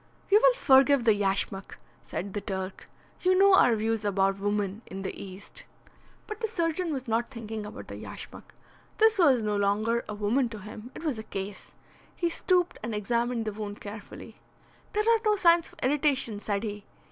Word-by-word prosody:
"You 415 - +8
will - - +6
forgive 275 - +5
the 225 -2 +5
yashmak," 195 -1 -2 0.2
said 195 +1 -5
the 205 - -3
Turk. 190 -1 -5 0.3
"You 370 0 +3
know 395 0 +6
our 245 -10 +6
views 220 0 -1
about 195 -1 +1
woman 205 0 -1
in 195 +1 -7
the - - -3
East." 190 0 -10 0.6
But 430 -1 -7
the 450 - -1
surgeon 340 -4 -1
was 265 -3 -4
not 230 +1 0
thinking 220 -4 -6
about 220 +5 -9
the - - -7
yashmak. - - -10 0.4
This 440 -2 +4
was 270 -9 +5
no 210 -1 0
longer 210 +4 +1
a 210 - -4
woman 230 +5 +1
to 225 - -7
him. 215 +3 -9
It - - -8
was 290 -9 -1
a - - -6
case. 195 -1 -7 0.4
He 345 -1 -1
stooped 360 0 +1
and 225 0 -4
examined 235 +2 -1
the 215 - -3
wound 205 -1 -6
carefully. 205 +1 -10 0.6
"There 425 0 +1
are 460 -1 +4
no 425 -1 +3
signs 340 -3 +4
of - - -18
irritation," 270 -5 +1
said 205 0 -2
he. 205 -2 -5
225 Hz, 185 wpm, -28 LUFS, 205-305 Hz, 0.6 s, You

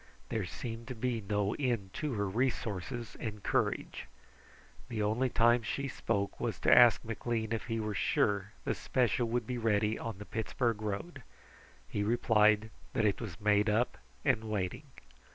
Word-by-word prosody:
There 110 -4 -1
seemed 115 +2 -6
to 125 - -5
be 120 0 -1
no 105 0 0
end 115 -9 -1
to 150 -3 -1
her 100 -2 0
resources 115 0 -2
and 105 -3 -5
courage. - - -1 0.8
The 110 -3 -1
only 115 +5 +1
time 120 +1 +4
she 135 +5 -2
spoke 100 -6 -2
was - - -2
to - - +6
ask 120 -1 +7
McLean 115 0 -2
if 115 - -2
he 115 -1 -2
were 105 -1 -2
sure 100 0 +1
the - - +1
special 120 -1 +1
would 120 0 -1
be 125 +1 -3
ready 105 -1 +1
on 115 -4 -5
the 105 - -8
Pittsburgh 115 0 -1
road. 110 +9 -4 0.7
He 105 - -2
replied 110 -1 +3 0.2
that 110 - +2
it 100 +2 +1
was 100 -8 -6
made 105 +1 +3
up 115 +4 +1 0.3
and 120 -6 +2
waiting. 100 -4 -2
110 Hz, 165 wpm, -32 LUFS, 105-120 Hz, 0.8 s, ask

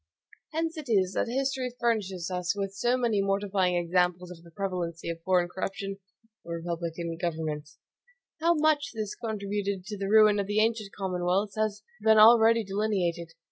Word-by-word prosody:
Hence 325 +1 -2
it 295 - -8
is 190 -4 +2
that - - 0
history 260 0 -1
furnishes 195 -7 -1
us 180 +1 -1
with 195 -1 -3
so 240 +5 +1
many 230 -5 +1
mortifying 195 -2 +1
examples 180 +1 0
of 170 -2 -11
the 170 - -15
prevalency 170 -3 -3
of 165 0 -8
foreign 180 0 +2
corruption 195 +2 -5 0.5
in 170 - -9
republican 170 0 -4
governments. 155 -3 -3 0.6
How 335 +2 +3
much 305 -2 +1
this 215 -2 -3
contributed 200 -3 -3
to 210 -1 -6
the 195 0 -2
ruin 215 -1 +6
of 200 - -1
the 205 +1 +1
ancient 220 -2 0
commonwealths 190 +1 -1
has 215 -1 -1 0.2
been 220 0 +5
already 225 +1 +7
delineated. 190 -5 -1
195 Hz, 160 wpm, -28 LUFS, 180-220 Hz, 0.6 s, already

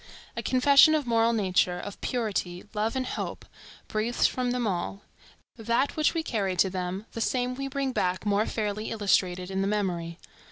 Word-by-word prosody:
A - - -2
confession 280 +4 +6
of 300 -3 0
moral 230 -1 +3
nature, 185 -4 +1
of 205 +2 -8
purity, 200 -7 -2
love, 220 +3 -1
and 260 -1 -1
hope, - - -5 0.4
breathes 220 +3 0
from 250 -1 +1
them 245 -1 -1
all. 195 +1 -3 0.5
That 235 +4 0
which 310 +2 +2
we 325 - 0
carry 200 -9 -1
to 185 +2 +2
them, 185 +2 -4
the 230 - -5
same 250 +2 0
we 275 +2 -4
bring 275 -1 -2
back 185 -4 -1
more 205 +1 +2
fairly 215 0 -2
illustrated 185 -4 +1
in 190 0 -1
the 195 - 0
memory. 175 -5 -2
215 Hz, 175 wpm, -27 LUFS, 190-250 Hz, 0.5 s, confession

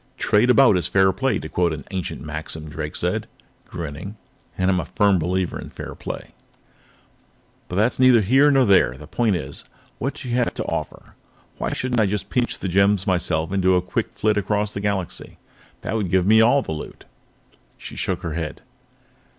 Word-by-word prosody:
"Trade 105 +4 +3
about 125 -6 +6
is 90 - 0
fair 95 0 +4
play, 135 +6 0
to - - -6
quote 85 +1 +1
an 75 -3 -5
ancient 90 -6 -4
maxim," 80 0 -6
Drake 75 - -5
said, - - -1 0.4
grinning. 85 +5 -6 0.4
"And 95 +1 +2
I - - +3
am 90 - +1
a 80 - -3
firm 100 -3 +2
believer 90 +2 -1
in - - -9
fair - - -8
play. - - -7 1.4
"But 90 - -6
that's 110 +7 +1
neither 130 -3 +6
here 135 +8 +4
nor 135 -2 +4
there. 95 - +4
The 75 - -11
point 110 +6 +1
is: 70 -4 -6 0.4
what 135 +3 -2
do 135 - -8
you 120 - 0
have 120 - 0
to - - -3
offer? - - -5 0.5
Why - - -2
shouldn't 125 -3 0
I 105 - +3
just 105 0 -3
pinch 125 -1 0
the - - -4
gems 100 +1 +3
myself 85 -4 0
and 100 -1 0
do 95 0 +4
a 90 - +3
quick 90 - -2
flit 105 -1 +1
across 105 +1 0
the 100 - -4
Galaxy? 100 -4 -3 0.4
That 110 - -3
would 105 -5 -1
give 95 0 +2
me 110 +2 +6
all 125 +4 +4
the - - -6
loot." 75 -1 -7 0.7
She - - -9
shook - - -2
her 80 -2 -3
head. 80 -2 -5
95 Hz, 200 wpm, -22 LUFS, 85-110 Hz, 1.4 s, about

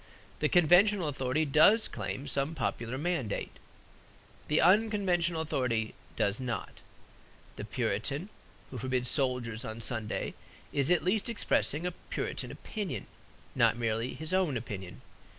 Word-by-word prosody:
The - - +2
conventional 180 +2 +5
authority 140 +2 0
does 160 +10 +5
claim 135 - -5
some 140 +4 -1
popular 125 -3 -2
mandate; 145 - -2 1.0
the 150 - +3
unconventional 185 -4 +3
authority 120 -8 -1 0.2
does 100 +3 +1
not. 125 -2 -4 0.8
The - - -6
Puritan 115 - -2 0.4
who 130 - -5
forbids 125 0 0
soldiers 125 -4 0
on 110 -2 -5
Sunday 115 -1 -2 0.4
is 140 +1 +1
at 180 - +3
least 205 +5 +1
expressing 175 -7 +1 0.2
Puritan - - -3
opinion; 205 -5 -5 0.5
not - - +3
merely 115 +1 -1
his 160 +6 -3
own 180 -8 +2
opinion. 95 -5 -7
140 Hz, 120 wpm, -31 LUFS, 115-175 Hz, 1.0 s, conventional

